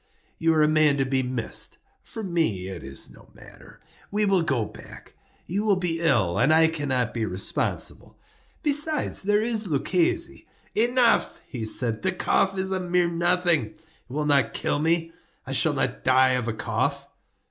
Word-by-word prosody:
You 165 0 +2
are 155 - +4
a - - +4
man 155 -2 +3
to 135 - +1
be 130 0 +1
missed. 125 -3 -1 0.2
For 225 - -8
me 160 - -1
it 95 - -7
is 70 +1 -6
no - - -17
matter. - - -16 0.3
We 210 +1 0
will 195 -3 +3
go 135 -9 0
back; - - -13 0.3
you 200 +5 -2
will 210 -2 +3
be 175 -3 -1
ill, 115 - +2
and 150 - +4
I 160 0 +5
cannot 135 -7 -1
be 115 - -2
responsible. 95 -2 -3 0.5
Besides, 300 +1 0
there 205 +2 +2
is 225 -2 -2
Luchesi—" 165 +3 0 0.3
"Enough," 240 +1 +2
he 115 -4 -5
said; 110 0 -1
"the 190 - +1
cough 195 +1 +1
is 190 0 -1
a 190 - 0
mere 180 -1 +1
nothing; 175 -3 +2
it - - -24 0.3
will 150 +4 -2
not 140 -6 +2
kill - - 0
me. 165 +1 +1 0.3
I - - -6
shall - - +3
not - - -2
die 130 0 +4
of 125 -2 -1
a 115 - -1
cough." - - -2
160 Hz, 175 wpm, -25 LUFS, 130-190 Hz, 0.5 s, I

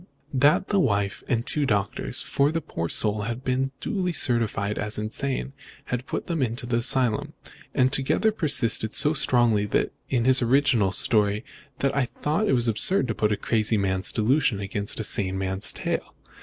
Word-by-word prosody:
That 145 +7 +3
the 200 - +2
wife 100 - 0
and 120 -1 0
two 150 - -1
doctors 105 +4 -1
for 140 +2 +1
the 165 - -1
poor 85 - -5
soul 105 +3 +1
had 115 +4 -4
been 130 +1 0
duly 180 +1 -2
certified 110 -7 0
as 105 +1 -2
insane 135 +5 -3 0.3
had 125 +1 -4
put - - -4
him 165 -4 -2
into 120 0 -2
the 120 -1 0
asylum; 120 -2 +1 0.4
and 130 0 +3
altogether 135 +11 +1
persisted 130 - +2
so 150 - +3
strongly 120 -7 +2 0.4
in 120 -3 0
his 130 0 +4
original 120 -5 +3
story 105 +1 +1 0.4
that 135 0 +1
I 140 -2 +2
thought 155 - -2
it - - +3
was 120 -2 +1
absurd 125 - +1
to - - 0
put 105 0 0
a 105 - 0
crazy 110 -1 0
man's 95 -1 -1
delusion 120 -1 +1
against 100 +1 -3
a - - -2
sane 95 -2 -1
man's 95 0 -2
tale. - - -4
120 Hz, 175 wpm, -25 LUFS, 105-135 Hz, 0.4 s, his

